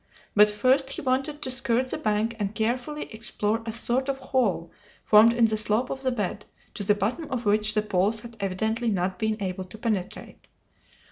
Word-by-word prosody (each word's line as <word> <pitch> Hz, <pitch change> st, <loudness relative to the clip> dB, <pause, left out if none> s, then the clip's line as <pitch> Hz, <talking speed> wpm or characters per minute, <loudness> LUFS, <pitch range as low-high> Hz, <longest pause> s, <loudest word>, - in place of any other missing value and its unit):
But 210 Hz, 0 st, +7 dB
first 260 Hz, +6 st, +2 dB
he -, -, -2 dB
wanted 270 Hz, +3 st, -1 dB
to 260 Hz, -, -2 dB
skirt 255 Hz, 0 st, +1 dB
the -, -, -1 dB
bank 215 Hz, +2 st, 0 dB
and 205 Hz, 0 st, -3 dB
carefully 250 Hz, +7 st, -2 dB
explore 220 Hz, 0 st, -1 dB
a -, -, -1 dB
sort 245 Hz, +4 st, 0 dB
of 275 Hz, -, -1 dB
hole 245 Hz, -10 st, -1 dB, 0.3 s
formed 215 Hz, +2 st, +6 dB
in 235 Hz, 0 st, +3 dB
the 220 Hz, -1 st, 0 dB
slope 215 Hz, +4 st, +1 dB
of 265 Hz, -, -4 dB
the 265 Hz, -, 0 dB
bed, 210 Hz, -3 st, -3 dB, 0.3 s
to 205 Hz, -, -4 dB
the 205 Hz, +1 st, +3 dB
bottom 220 Hz, +11 st, -2 dB
of 250 Hz, -4 st, -3 dB
which 215 Hz, +1 st, +2 dB
the 215 Hz, -, +2 dB
poles 210 Hz, +2 st, +1 dB
had 235 Hz, 0 st, -11 dB
evidently 220 Hz, +5 st, -1 dB
not 185 Hz, -2 st, -1 dB
been 220 Hz, -1 st, 0 dB
able 185 Hz, -1 st, -4 dB
to 185 Hz, +4 st, -11 dB
penetrate. 210 Hz, -5 st, -4 dB
220 Hz, 195 wpm, -26 LUFS, 210-255 Hz, 0.3 s, But